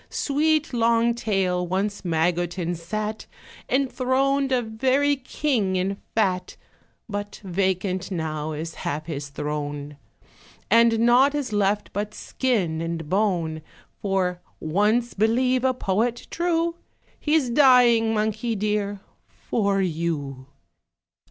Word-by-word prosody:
Sweet 305 +1 +1
long 235 0 +3
tail, 190 -6 0
once 200 +3 -1
Magotin 175 +1 0
sat 215 +6 -4 0.4
Enthroned 270 +1 +1
a 250 -2 +2
very 265 +6 +1
king 255 -7 -1
in 190 +2 0 0.2
fat; 190 -5 0 0.5
But 205 -1 -5
vacant 190 0 -1
now 155 -3 -3
is 160 +2 -5
half 150 +2 -3
his 145 -3 -5
throne, 145 0 -4 0.7
And 230 0 +5
naught 250 +5 +5
is 275 -7 -3
left 205 0 0
but 210 +1 -3
skin 190 -12 -1
and 165 -2 -4
bone; 175 -6 0 0.4
For 185 -3 0 0.2
(once 210 +9 +1
believe 250 +4 +2
a 260 - +4
Poet 230 +2 -1
true) 340 0 0 0.4
He's 300 -5 +1
dying, 240 -4 +5
monkey 220 +2 -1
dear! 205 -1 -1 0.3
for 200 -3 -1
you. 155 -6 -3
205 Hz, 110 wpm, -24 LUFS, 175-245 Hz, 0.7 s, And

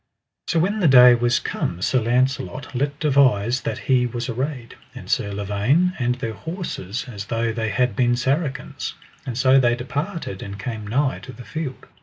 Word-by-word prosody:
So 170 - 0
when 200 +6 +1
the 180 - +3
day 125 -2 +9
was 120 0 +2
come 85 - -3
Sir 130 - +2
Launcelot 125 -2 -1
let 140 +3 -2
devise 130 -5 +3
that - - -3
he 125 -3 +3
was 120 +1 -4
arrayed, 125 0 -4 0.2
and - - -9
Sir 100 - 0
Lavaine, 105 - +1
and 125 0 +1
their 120 -3 -4
horses, 135 - -5
as 100 -5 -7
though 115 +1 -1
they 110 -1 -2
had 125 +1 +1
been 120 -1 +2
Saracens; 135 +4 -2 0.3
and 120 -2 -4
so 130 +1 +5
they 120 -2 +3
departed 145 - -4
and 100 0 -7
came 110 -1 -5
nigh 135 +5 0
to 130 - -10
the 125 -1 -12
field. 145 +2 -5
125 Hz, 180 wpm, -22 LUFS, 115-140 Hz, 0.3 s, day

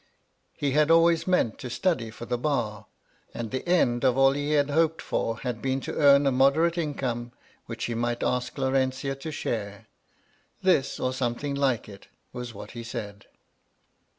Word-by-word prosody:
He 140 -2 0
had 150 +2 +3
always 165 0 +4
meant 180 -12 +1
to 125 - -6
study 125 -4 0
for 115 +1 -9
the 120 - -1
bar, 120 -7 -2 0.5
and 115 -2 -5
the 130 +6 -4
end 120 -9 +2
of 130 -1 +3
all 135 0 +6
he 145 +2 -1
had 145 -1 +2
hoped 160 +1 +2
for 115 0 -2
had 125 -4 -4
been 135 0 0
to - - -5
earn 140 -1 +5
a 135 - +3
moderate 140 +6 +3
income, 130 -7 -3 0.3
which 115 0 -6
he 120 - -2
might 120 +1 -1
ask 125 +2 -1
Laurentia 130 0 0
to 155 +3 -6
share. 105 -6 -4 0.8
This, 160 -8 +2
or 130 - -1
something 130 +2 -2
like 135 -4 0
it, 100 -2 -13 0.3
was 125 -1 -6
what 105 -1 -10
he 120 -1 -7
said. 105 -3 -7
130 Hz, 175 wpm, -26 LUFS, 120-145 Hz, 0.8 s, all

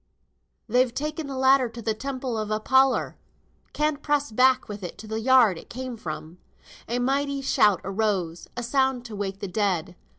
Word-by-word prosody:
"They've 250 +2 +3
taken 300 +3 -4
th' 270 -1 -5
ladder 265 -1 +4
into 230 0 -9
th' 215 -1 -2
Temple 260 -2 -3
of 215 -1 -3
Apollor. 260 +5 +2 0.5
Can't 300 -1 -1
press 290 -3 0
back 255 +3 +3
with 205 -1 -7
it 180 - -7
to 220 - -10
the 220 +1 -3
yard 235 -7 +4
it - - -15
came 255 0 -5
from." 160 -3 -7 0.5
A 240 - 0
mighty 275 +3 0
shout 210 -6 +3
arose; 190 -4 -2
a 240 - -2
sound 265 0 +1
to 225 -3 -7
wake 195 -1 -4
the 200 - -3
dead. 185 -3 -1
235 Hz, 175 wpm, -25 LUFS, 205-265 Hz, 0.5 s, ladder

